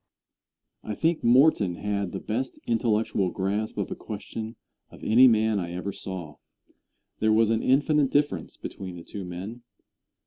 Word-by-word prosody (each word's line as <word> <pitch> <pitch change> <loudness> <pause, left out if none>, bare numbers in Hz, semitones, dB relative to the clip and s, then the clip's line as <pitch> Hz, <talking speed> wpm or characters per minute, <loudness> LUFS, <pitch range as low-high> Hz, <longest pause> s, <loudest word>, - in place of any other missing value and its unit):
Answer. - - -5
I - - -3
think 165 0 +1
Morton 120 - +4
had 100 -1 -2
the - - -4
best 125 +5 -3
intellectual 110 -4 +1
grasp 100 +4 -2
of - - -2
a - - -2
question 110 +1 -7 0.3
of - - -15
any 125 +4 +7
man 110 -2 +3
I 85 -1 -4
ever 90 +3 -3
saw. 90 -8 -7 0.8
There 110 0 +3
was 110 0 +4
an 115 - +1
infinite 145 +1 +3
difference 140 - 0
between 95 -2 -7
the 85 - -9
two 100 +2 -7
men. 95 +7 -7
110 Hz, 160 wpm, -26 LUFS, 95-120 Hz, 0.8 s, any